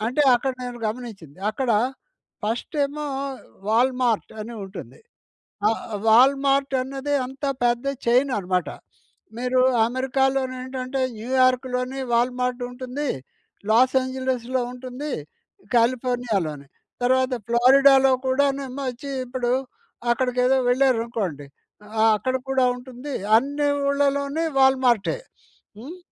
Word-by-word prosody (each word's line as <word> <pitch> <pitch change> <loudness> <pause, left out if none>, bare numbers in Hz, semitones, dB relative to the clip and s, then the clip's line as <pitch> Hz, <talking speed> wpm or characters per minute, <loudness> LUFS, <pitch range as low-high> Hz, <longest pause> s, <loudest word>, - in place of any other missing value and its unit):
అంటే, 260 +5 +1
అక్కడ 265 +2 0
నేను 245 -1 -6
గమనించింది. 215 - -7
అక్కడ 245 +3 -2 0.7
ఫస్ట్ 225 +8 -3
ఏమో 300 +2 -5 0.6
వాల్మార్ట్ 245 0 +1
అని 230 +2 -7
ఉంటుంది. 190 +1 -10 0.7
ఆహ్, 225 - 0 0.3
వాల్మార్ట్ 275 +4 +4
అన్నది 275 +2 -4
అంతా 270 +2 -4
పెద్ద 240 +2 +1 0.2
చైన్ 255 +3 +3
అనమాట. 180 -2 -1 0.7
మీరు 250 +1 +1 0.3
అమెరికాలోని 265 +1 0
ఏంటంటే, 260 +1 -4 0.2
న్యూయార్క్‌లోని 255 +2 +1
వాల్మార్ట్ 250 +1 0
ఉంటుంది, 255 +3 -4 0.6
లాస్ 255 +4 +4
ఏంజిల్స్‌లో 260 -1 -2
ఉంటుంది, 255 +4 -6 0.6
కాలిఫోర్నియాలోని 230 - 0 0.4
తర్వాత 260 +1 +2
ఫ్లోరిడాలో 265 +3 +6
కూడానేమో 275 0 0
వచ్చి 255 +3 -8 0.2
ఇప్పుడు 245 -1 -2 0.6
అక్కడికి 250 +1 0
ఏదో 265 +1 +4
వెళ్లారనుకోండి. 230 - 0 0.5
ఆహ్, 220 0 +6
అక్కడ 255 +5 -2 0.2
కూడా 265 -1 +3
ఉంటుంది. 255 +3 -8 0.2
అన్ని 285 +4 0 0.2
ఊళ్లలోని 280 +2 0
వాల్మార్టే. 260 - +3 0.6
హ్మ్. 295 +10 -9
255 Hz, 100 wpm, -23 LUFS, 240-270 Hz, 0.7 s, ఫ్లోరిడాలో